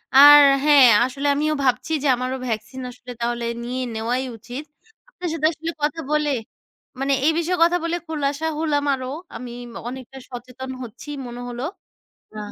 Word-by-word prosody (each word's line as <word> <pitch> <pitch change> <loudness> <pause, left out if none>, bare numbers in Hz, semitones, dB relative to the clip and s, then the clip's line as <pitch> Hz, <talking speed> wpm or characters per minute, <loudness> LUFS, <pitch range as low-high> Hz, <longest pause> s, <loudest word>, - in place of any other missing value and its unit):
আর 290 +2 +11 0.2
হ্যাঁ, 290 -4 +7 0.2
আসলে 275 +3 -3
আমিও 305 +1 +1
ভাবছি 255 +4 +1
যে, 290 - +2
আমারও 255 +1 -3
ভ্যাকসিন 225 +4 -4
আসলে 250 0 -11
তাহলে 235 0 -1 0.2
নিয়ে 250 +2 -3
নেওয়াই 240 +4 -1
উচিত। 245 +7 -8 0.4
আপনার 360 -7 -5
সাথে 310 -1 -1
আসলে 325 +1 -5
কথা 300 +2 0
বলে, 300 -1 +2 0.7
মানে 275 +1 +1
এই 320 - +5
বিষয়ে 355 +2 0
কথা 345 +1 +4
বলে 335 +1 -1
খোলাসা 295 0 -2
হলাম 295 -3 +1
আরও, 255 -1 -4 0.3
আমি 250 -1 -7 0.4
অনেকটা 260 +1 -9
সচেতন 255 +1 -8
হচ্ছি 245 +6 -10 0.2
মনে 240 0 -7
হলো। 245 +1 -5 0.7
আ - - -5
265 Hz, 160 wpm, -22 LUFS, 245-300 Hz, 0.7 s, আর